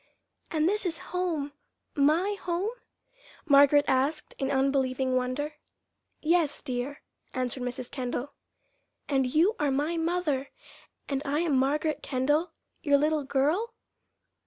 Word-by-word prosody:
"And 315 -1 +1
this 420 +3 +1
is 340 -4 -2 0.2
home 335 -6 -1 0.4
my 315 +8 +3
home?" 360 +5 -1 0.7
Margaret 285 -1 +6
asked 275 +4 0
in 270 -1 0
unbelieving 265 -1 +1
wonder. 265 +4 -2 0.7
"Yes, 325 -2 +2
dear," 255 +3 -4 0.3
answered 255 0 -2
Mrs. 250 0 -4
Kendall. 255 +1 -4 0.7
"And 270 -3 +2
you 335 - +3
are 295 - +2
my 295 +5 0
mother, 325 -5 0 0.6
and 275 -1 -1
I 295 +2 0
am 325 -5 +1
Margaret 295 +4 +1
Kendall, 290 +6 +1 0.3
your 285 -2 +4
little 300 +1 +1
girl?" 310 - 0
285 Hz, 120 wpm, -28 LUFS, 265-325 Hz, 0.7 s, Margaret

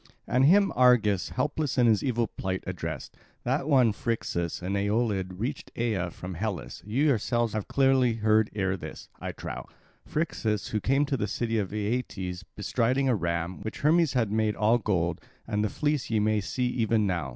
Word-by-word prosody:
And 130 +3 +3
him 195 +6 +5
Argus, 115 -7 +4
helpless 145 +2 -1
in 125 - +5
his 110 -3 +3
evil 120 -4 +1
plight, 95 -3 -4
addressed: 85 -5 -5 0.3
"That 135 +3 0
one 125 -6 +5
Phrixus 85 -8 -2
an 95 +2 -2
Aeolid 100 -3 0
reached 130 +5 -4
Aea 105 -7 -1
from 90 +2 -7
Hellas 90 - -4
you 120 +7 +1
yourselves 120 -3 +1
have 110 -2 -3
clearly 135 -3 +3
heard 110 -1 +2
ere 95 -2 0
this, 95 - -9
I - - -4
trow; - - -7 0.4
Phrixus, 110 - -2
who 110 - 0
came 135 +6 +2
to 140 -1 -1
the 105 - -1
city 115 +2 -1
of 95 -3 -3
Aeetes, 105 -4 -3
bestriding 130 +4 +1
a 125 - +3
ram, 85 -1 -2
which 110 - -6
Hermes 160 0 +4
had 115 -5 +1
made 110 -1 +1
all 110 +3 +3
gold; 85 -6 0 0.2
and 105 0 -1
the 105 - +1
fleece 145 +3 -1
ye 110 -2 +2
may 105 0 +2
see 125 +6 -2
even 115 -3 +1
now. 85 -7 -1
110 Hz, 180 wpm, -28 LUFS, 95-125 Hz, 0.4 s, him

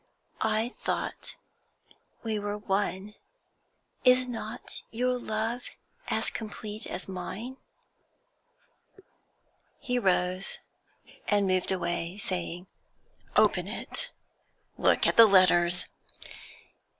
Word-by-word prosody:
I 220 +2 +1
thought - - -3 0.9
we 220 -2 -1
were 205 0 -3
one. 200 0 -1 0.9
Is 255 0 +5
not 225 -2 -6
your 250 +2 0
love 225 +2 -2 0.4
as - - +1
complete 215 -1 -6
as 185 - -4
mine?' 200 +7 -6 2.2
He 250 -4 0
rose 185 -2 +1 0.7
and 205 -1 +3
moved 185 0 +2
away, 175 0 -2
saying 180 -2 -2 0.7
'Open - - +4
it! - - -4 0.7
Look - - +3
at - - +2
the 230 -1 +11
letters!' 180 -2 +5
205 Hz, 90 wpm, -29 LUFS, 185-225 Hz, 2.2 s, the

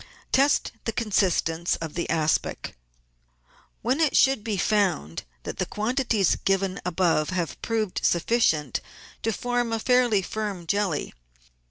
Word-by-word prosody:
Test 280 +2 +3
the 225 - 0
consistence 185 -7 +1
of 160 -2 -6
the 170 - -3
aspic, 160 -1 0 1.1
when 255 +6 +1
it 315 -3 +3
should 270 -5 +4
be 215 -3 -2
found 180 - 0 0.2
that - - -6
the - - +1
quantities 220 -3 +1
given 195 -1 0
above 170 -3 +1
have 175 -7 -3
proved 220 -4 -2
sufficient 165 - +2 0.4
to 225 - 0
form 245 +2 -1
a 225 - +1
fairly 240 -3 +3
firm 205 -4 -4
jelly. 195 -3 -1
200 Hz, 130 wpm, -25 LUFS, 170-230 Hz, 1.1 s, should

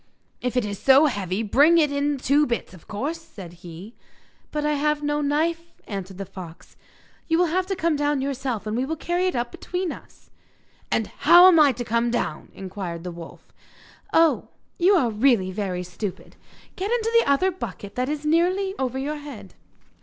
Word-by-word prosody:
'If 250 0 -2
it 245 - +2
is 200 -1 -5
so 275 +3 +6
heavy 200 - -1
bring 290 +10 +5
it 300 -3 +3
in 285 0 0
two 285 +3 +2
bits, 235 -5 -3
of 180 - -16
course,' 290 +11 -4
said 195 - -11
he. 175 +6 -10 0.6
'But 300 0 -2
I 300 - +2
have 295 +1 0
no 295 0 0
knife,' 330 +4 -1
answered 195 -2 -6
the 195 - -5
fox. 180 -3 -11 0.5
'You 325 - +2
will 355 - +4
have 370 0 0
to 390 - -1
come 330 -3 0
down 290 -1 +1
yourself, 265 -5 -3
and 215 +1 -3
we 250 - 0
will 310 +4 -2
carry 350 +3 -1
it 365 - -1
up 240 0 -2
between 360 -1 -4
us.' - - -14 0.6
'And - - +1
how 350 +1 +6
am 350 -3 +6
I 295 -2 +6
to 245 0 -5
come 235 +1 +1
down?' 235 -10 -3
inquired 185 -3 -6
the 180 - -5
wolf. 170 -1 -12 0.6
'Oh, 325 -1 +3 0.3
you 375 +3 +5
are 250 -10 +2
really 215 -4 +2
very 185 -2 -3
stupid! 180 +2 -7 0.4
Get 385 +2 -3
into 455 -1 0
the 465 - 0
other 325 +7 +3
bucket 205 - -7
that 255 +2 -2
is 300 0 -4
nearly 365 +5 +2
over 260 -1 -1
your 290 +3 -3
head. 260 -10 -10
275 Hz, 190 wpm, -24 LUFS, 205-320 Hz, 0.6 s, so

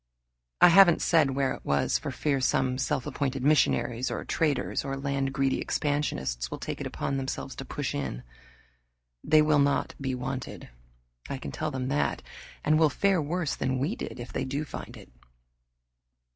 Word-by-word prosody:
I - - +9
haven't 175 -1 +7
said 155 -4 +4
where 135 0 0
it - - -10
was 70 -4 +1
for - - -5
fear 140 -3 -1
some 130 0 +1
self 135 -1 -1
appointed 135 -2 -2
missionaries, 130 -4 +2
or - - -4
traders, 145 -6 0
or 135 -1 -3
land 135 -1 -1
greedy 135 0 0
expansionists, 65 - -1
will - - -5
take - - -5
it - - -3
upon 135 - -3
themselves 135 0 -4
to 135 - -6
push 145 +1 -3
in. 65 - -4 1.0
They 155 0 +5
will 150 -1 +3
not 140 0 +1
be 130 -1 -1
wanted, 130 +1 -5 0.6
I 140 - -3
can - - -7
tell 155 - -3
them 130 -3 -3
that, 145 +2 0 0.4
and 155 +1 +3
will 160 -2 +5
fare 195 +4 +2
worse 165 +1 -2
than 130 0 -1
we 150 - -1
did - - -7
if 120 0 -8
they - - -1
do 140 +3 -3
find - - -8
it. - - -14
135 Hz, 175 wpm, -28 LUFS, 130-150 Hz, 1.0 s, I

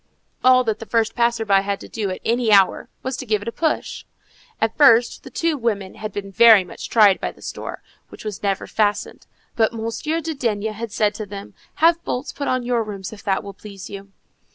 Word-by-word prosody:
All 255 0 +6
that 220 -2 -1
the 225 - -9
first 225 -1 +1
passer 235 -1 +1
by 195 -2 +4
had 200 0 -3
to - - -9
do 210 -3 -3
at 185 - -5
any 235 -1 +1
hour, 195 -2 +4
was 260 0 -2
to 260 - -6
give 210 -2 0
it - - -11
a - - -1
push. 315 +5 -2 0.6
At 225 - 0
first, 240 -5 +5
the - - -11
two 330 -2 -1
women 205 -6 -2
had 215 0 -6
been 195 -1 -6
very 225 -1 +7
much 180 - -9
tried 210 -4 +5
by - - -2
this - - -8
door, - - -8 0.3
which - - -12
was 210 -2 -5
never 195 -2 -1
fastened, 210 -1 -1 0.3
but 225 0 +2
Monsieur 230 +8 -2
de 325 0 -4
D—— 225 -7 -2
had 220 +1 -4
said 210 0 +1
to 210 0 -6
them, 200 0 -9 0.3
"Have 335 0 +4
bolts 255 -3 -4
put 285 - -4
on 255 -1 0
your 240 -1 0
rooms, 205 -2 -6
if 205 - -11
that 195 -1 0
will 200 - -8
please 195 -1 -11
you." 200 0 -9
220 Hz, 225 wpm, -21 LUFS, 200-240 Hz, 0.6 s, very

